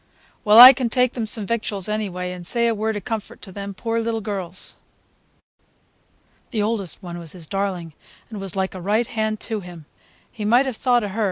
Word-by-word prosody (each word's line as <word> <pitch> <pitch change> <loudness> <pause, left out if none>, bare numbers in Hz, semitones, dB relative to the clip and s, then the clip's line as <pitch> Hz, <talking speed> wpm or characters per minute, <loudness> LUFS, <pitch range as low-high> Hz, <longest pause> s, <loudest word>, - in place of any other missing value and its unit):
"Well, 210 -1 +5
I 250 +3 +13
can 250 -2 -2
take 250 +1 +1
them 230 -3 -3
some 215 -1 0
victuals, 210 -4 0
anyway, 190 -4 -3
and 180 -1 -8
say 235 +6 0
a 230 - +2
word 220 0 -2
of 200 - -8
comfort 220 -2 -5
to 190 - -10
them 200 +1 -7
poor 230 +2 -2
little 225 0 -2
girls. 190 -4 -5 1.7
The 215 -5 -1
oldest 205 -5 -3
one 175 -1 -7
was 165 -2 -7
his 175 -3 -8
darling, 185 -3 -3 0.4
and 210 -3 -6
was 195 -1 -3
like 190 0 -1
a 185 - -8
right 210 +6 +1
hand 215 -1 -2
to 220 -2 -3
him. 175 -4 -11 0.5
He 215 - -7
might 240 +6 +4
have 260 -3 -3
thought 245 -3 +2
of 205 - -4
her. 220 - -5
210 Hz, 205 wpm, -22 LUFS, 190-230 Hz, 1.7 s, I